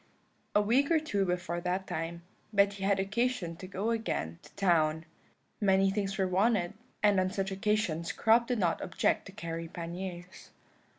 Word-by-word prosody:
"A 210 Hz, -, +6 dB
week 255 Hz, +7 st, +3 dB
or 330 Hz, -2 st, +4 dB
two 205 Hz, -11 st, 0 dB
before 175 Hz, -1 st, -2 dB
that 180 Hz, +2 st, -1 dB
time, 165 Hz, +1 st, -4 dB, 0.3 s
Betty 200 Hz, -1 st, +2 dB
had 195 Hz, 0 st, +2 dB
occasion 210 Hz, -3 st, -1 dB
to 185 Hz, -, -8 dB
go 200 Hz, +4 st, -2 dB
again 85 Hz, -, -2 dB
to -, -, -16 dB
town. 160 Hz, -4 st, +2 dB, 0.5 s
Many 195 Hz, -1 st, +4 dB
things 195 Hz, -1 st, -2 dB
were 190 Hz, -2 st, +2 dB
wanted, 190 Hz, 0 st, +2 dB, 0.3 s
and 205 Hz, -2 st, +5 dB
on 185 Hz, 0 st, +2 dB
such 195 Hz, 0 st, -2 dB
occasions 190 Hz, -4 st, 0 dB
Crop 230 Hz, +2 st, +3 dB
did 245 Hz, -, 0 dB
not 175 Hz, -5 st, +1 dB
object 175 Hz, -, 0 dB
to -, -, -9 dB
carry 165 Hz, -4 st, -5 dB
panniers. 175 Hz, +1 st, -7 dB
190 Hz, 165 wpm, -31 LUFS, 175-210 Hz, 0.5 s, A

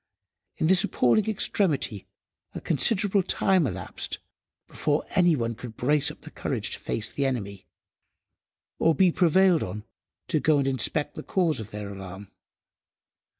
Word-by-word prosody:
In -, -, 0 dB
this 185 Hz, +2 st, +3 dB
appalling 160 Hz, -, +2 dB
extremity, 160 Hz, -, -1 dB, 0.5 s
a -, -, -3 dB
considerable 195 Hz, -, +2 dB
time 185 Hz, -3 st, +2 dB
elapsed -, -, -4 dB, 0.5 s
before 150 Hz, 0 st, -1 dB
any 175 Hz, -3 st, +4 dB
one 115 Hz, -3 st, -2 dB
could 115 Hz, 0 st, -10 dB
brace 150 Hz, +3 st, +2 dB
up 150 Hz, -, -11 dB
courage 115 Hz, -4 st, -3 dB
to -, -, -5 dB
face 115 Hz, 0 st, -1 dB
the 140 Hz, -1 st, 0 dB
enemy, 100 Hz, -7 st, -4 dB, 1.1 s
or 165 Hz, -1 st, +3 dB
be 185 Hz, +3 st, +4 dB
prevailed 180 Hz, 0 st, +4 dB
on 105 Hz, +3 st, -5 dB, 0.5 s
to 155 Hz, -, +2 dB
go 155 Hz, 0 st, +3 dB
and 140 Hz, -, +1 dB
inspect 140 Hz, +3 st, 0 dB
the -, -, -7 dB
cause 170 Hz, -7 st, 0 dB
of 110 Hz, -2 st, -7 dB
their 105 Hz, -1 st, -6 dB
alarm. 95 Hz, 0 st, -9 dB
145 Hz, 145 wpm, -26 LUFS, 110-175 Hz, 1.1 s, any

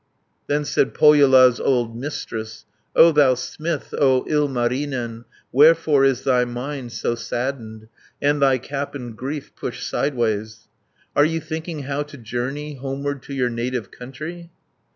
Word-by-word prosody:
Then 145 Hz, +1 st, 0 dB
said 135 Hz, -, 0 dB
Pohjola's 135 Hz, -5 st, +6 dB
old 120 Hz, -3 st, 0 dB
Mistress, 115 Hz, -4 st, -6 dB, 0.3 s
"O 165 Hz, +1 st, +8 dB
thou 145 Hz, -4 st, +4 dB
smith, 140 Hz, +7 st, -4 dB
O 130 Hz, -3 st, +3 dB
Ilmarinen 125 Hz, -4 st, -1 dB, 0.3 s
Wherefore 150 Hz, 0 st, +5 dB
is 135 Hz, -2 st, +1 dB
thy 125 Hz, -2 st, +3 dB
mind 125 Hz, +1 st, -5 dB
so 120 Hz, -, -1 dB
saddened, 115 Hz, -2 st, -5 dB, 0.3 s
And 145 Hz, 0 st, +1 dB
thy 135 Hz, -2 st, +4 dB
cap 140 Hz, +3 st, -5 dB
in 120 Hz, -4 st, -6 dB
grief 135 Hz, +5 st, -6 dB
pushed -, -, -5 dB
sideways? 110 Hz, -5 st, -2 dB, 0.5 s
Are 145 Hz, -, +5 dB
you 165 Hz, +2 st, +1 dB
thinking 160 Hz, -1 st, -5 dB
how 140 Hz, +2 st, -2 dB
to 145 Hz, -1 st, -8 dB
journey, 135 Hz, +5 st, -4 dB
Homeward 140 Hz, +1 st, -4 dB
to 140 Hz, -, -8 dB
your 125 Hz, -2 st, 0 dB
native 120 Hz, -2 st, -3 dB
country?" 155 Hz, +7 st, -8 dB
135 Hz, 135 wpm, -22 LUFS, 120-145 Hz, 0.5 s, O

